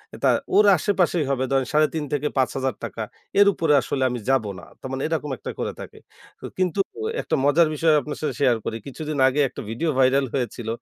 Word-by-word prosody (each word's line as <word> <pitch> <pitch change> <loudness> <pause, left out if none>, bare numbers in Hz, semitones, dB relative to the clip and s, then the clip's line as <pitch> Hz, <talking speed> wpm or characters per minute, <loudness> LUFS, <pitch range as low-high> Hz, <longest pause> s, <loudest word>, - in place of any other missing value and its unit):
এটা - - +1 0.3
ওর 210 +1 +6
আশেপাশেই 180 -6 +1
হবে 130 -1 0
ধরেন 135 -1 +2
৩.৫ 155 0 +2
থেকে 145 +1 0
৫ 130 - +3
হাজার 130 -1 -1
টাকা। 110 - -4 0.4
এর 205 - +7
উপরে 160 -4 +1
আসলে 130 +1 -2
আমি 125 - -3
যাবো 130 -6 +2
না। - - -14 0.2
তার 130 - -7
মানে 135 - -3
এরকম 155 -2 -2
একটা - - -6
করে - - -2
থাকে। - - -11 0.4
তো - - -7
কিন্তু 185 +1 0 0.4
একটা - - -1
মজার 160 +3 +4
বিষয় 160 +1 +3
আপনার 150 +2 -6
সাথে 155 - -2
শেয়ার 125 -4 +4
করি। 115 - -3
কিছুদিন 150 +2 -5
আগে 135 +3 0
একটা - - -8
ভিডিও 120 +9 -2
ভাইরাল 135 +1 +4
হয়েছিল 120 -3 -3
140 Hz, 205 wpm, -23 LUFS, 130-160 Hz, 0.4 s, এর